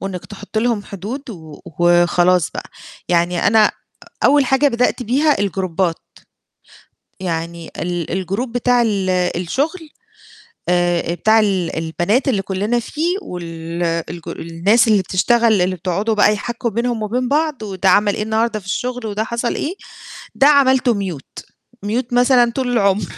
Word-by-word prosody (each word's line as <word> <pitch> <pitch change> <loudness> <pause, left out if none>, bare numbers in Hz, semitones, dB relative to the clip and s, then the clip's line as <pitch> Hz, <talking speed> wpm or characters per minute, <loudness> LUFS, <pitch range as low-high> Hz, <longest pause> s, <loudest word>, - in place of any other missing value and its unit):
وإنِّك 190 -2 -6
تحطي 205 +1 -5
لهم 230 -3 0
حدود 220 +8 -7
و 160 -7 -11 0.2
وخلاص 175 0 +3
بقى، - - -8 0.4
يعني 175 0 +1
أنا 215 0 +5
أ - - -1 0.5
أول 290 -1 +5
حاجة 270 +2 +3
بدأت 250 0 0
بيها 280 +6 +2
الجروبات، 185 -3 -1 1.2
يعني 170 -2 -4
ال 175 +2 -3
الgroup 200 +8 -2
بتاع 245 +1 +2
ال 200 -5 0 0.3
الشغل 300 - -2 0.8
آآ 175 -1 +1
بتاع 220 +5 +3
ال 195 -5 0
البنات 175 - 0
اللي 210 -7 +1
كُلّنا 200 +5 -1
فيه 325 - -2
وال 170 - -6 0.3
الج 170 0 -9
الناس 175 +9 +1
اللي 215 -2 +4
بتشتغل 220 +3 +2
اللي 185 +1 0
بتقعدوا 190 +5 -1
بقى 210 0 +4
يحّكوا 235 +3 -3
بينهم 235 +1 -2
وبين 245 +4 -1
بعض 300 -5 0
وده 190 -2 0
عمل 205 +2 +4
إيه - - -2
النهارده 220 0 0
في 190 - -18
الشغل 245 +5 -3
وده 215 0 -2
حصَل 235 +1 -2
إيه، 330 +6 -3 0.6
ده 275 - +4
عملته 265 -4 +4
mute 185 -9 -6 0.4
،mute 235 +4 -2
مثلًا 245 -1 +4
طول 255 -2 -1
العمر، 200 -3 +2
210 Hz, 145 wpm, -18 LUFS, 180-245 Hz, 1.2 s, أنا